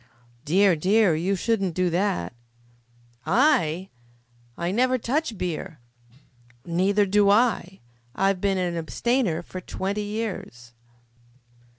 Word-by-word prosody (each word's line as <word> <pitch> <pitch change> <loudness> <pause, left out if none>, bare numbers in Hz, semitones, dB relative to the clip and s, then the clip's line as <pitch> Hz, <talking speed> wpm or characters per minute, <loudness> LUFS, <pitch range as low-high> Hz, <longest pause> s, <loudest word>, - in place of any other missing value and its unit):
"Dear, 190 +3 +4
dear, 190 +3 +3
you 175 +5 0
shouldn't 195 -3 -1
do 185 -1 +1
that." 165 - -1 0.9
"I! 195 - +2 0.7
I 170 +1 -2
never 255 +5 +2
touch 255 0 -2
beer." 175 -1 -4 0.9
"Neither 190 +4 +2
do 200 +1 +3
I. 205 - +1 0.3
I've 195 -1 +1
been 195 -1 +1
an 180 -2 -1
abstainer 175 +1 -1
for 185 +1 -8
twenty 200 +3 -3
years." 205 - -6
195 Hz, 105 wpm, -24 LUFS, 175-215 Hz, 0.9 s, Dear